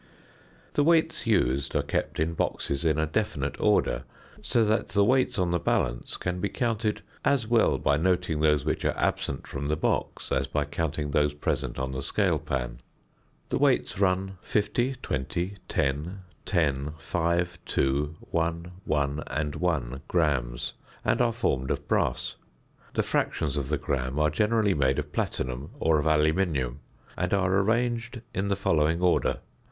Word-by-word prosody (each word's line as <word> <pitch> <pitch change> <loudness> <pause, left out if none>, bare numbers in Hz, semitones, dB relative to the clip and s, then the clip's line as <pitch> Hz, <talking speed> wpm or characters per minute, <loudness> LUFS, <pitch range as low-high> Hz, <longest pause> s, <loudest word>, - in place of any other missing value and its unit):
The 145 - +3
weights 165 -3 +2
used 70 - +2
are - - +2
kept - - -2
in 80 +2 +1
boxes 70 -3 -1
in 80 -2 +2
a 80 - +2
definite 80 -5 -2
order, - - +2 0.4
so 115 -2 +2
that 110 +2 +1
the 100 0 +3
weights 130 +1 +2
on 90 -2 +1
the 85 - +1
balance - - -1
can 90 0 -2
be 100 - 0
counted 115 -3 -1 0.2
as 140 -5 +2
well 115 0 +3
by 70 - +2
noting 90 -1 +1
those 75 -2 +3
which - - -1
are - - 0
absent 65 - -1
from 70 +1 -4
the 75 - +1
box - - -1
as 65 +1 +1
by 75 +1 0
counting 75 0 -2
those 75 0 +2
present 75 - -2
on 65 0 -2
the 65 0 -3
scale - - +1
pan. - - -3 0.7
The - - 0
weights 130 -7 +2
run 95 -1 +1
50, 115 +5 0
20, 85 +9 -2
10, 75 +8 -1 0.3
10, 75 -5 +1
5, 85 +2 -1
2, 70 +3 0
1, 85 +1 -2
1 70 0 0
and 75 -1 -2
1 70 -7 -1
grams, 65 -7 0 0.3
and - - +2
are 120 -1 +3
formed 70 - -1
of - - -2
brass. - - 0 0.6
The - - +2
fractions 75 -3 0
of 70 -2 -2
the 75 - +1
gram 65 -1 -2
are 75 0 +3
generally 105 +3 +2
made 70 -3 +2
of - - -3
platinum 65 +4 -2
or 80 -1 +3
of 75 - 0
aluminium, 75 -4 +2 0.4
and 90 +2 0
are 95 -1 +2
arranged 115 +3 0
in 95 +1 -1
the 100 - +1
following 80 -4 +2
order: 90 - +3
0. - - -11
80 Hz, 165 wpm, -27 LUFS, 70-100 Hz, 0.7 s, The